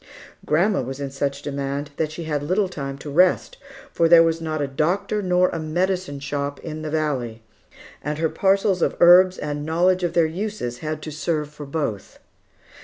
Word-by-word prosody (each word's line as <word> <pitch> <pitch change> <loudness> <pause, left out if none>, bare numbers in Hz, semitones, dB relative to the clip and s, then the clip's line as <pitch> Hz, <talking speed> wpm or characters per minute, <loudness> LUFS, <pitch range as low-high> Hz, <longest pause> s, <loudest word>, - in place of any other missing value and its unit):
Grandma 185 +7 +2
was 130 +2 -6
in 140 -1 -4
such 140 0 -3
demand 140 0 -4
that 155 -1 -1
she 165 +2 -6
had 150 -3 -2
little 185 +7 +1
time 140 -6 -6
to 145 +1 -8
rest; 180 +5 +2 0.3
for 165 -1 +2
there 165 -1 +8
was 165 0 0
not 155 -1 -3
a 145 - 0
doctor 170 +9 -1
nor 180 -1 +2
a 165 - -4
"medicine 175 -1 -1
shop" 140 0 -3
in 155 -2 -6
the 155 - -4
valley, 135 -8 -2 0.6
and 150 0 -3
her 160 +1 +1
parcels 195 +1 +1
of - - +1
herbs 180 +2 +7
and 145 -1 -4
knowledge 175 +4 +2
of 175 - -1
their 170 -2 +4
uses 165 - -4
had 155 -1 -4
to 155 - -6
serve 150 0 -2
for 150 -1 -9
both. 140 -9 -4
155 Hz, 185 wpm, -22 LUFS, 145-180 Hz, 0.6 s, there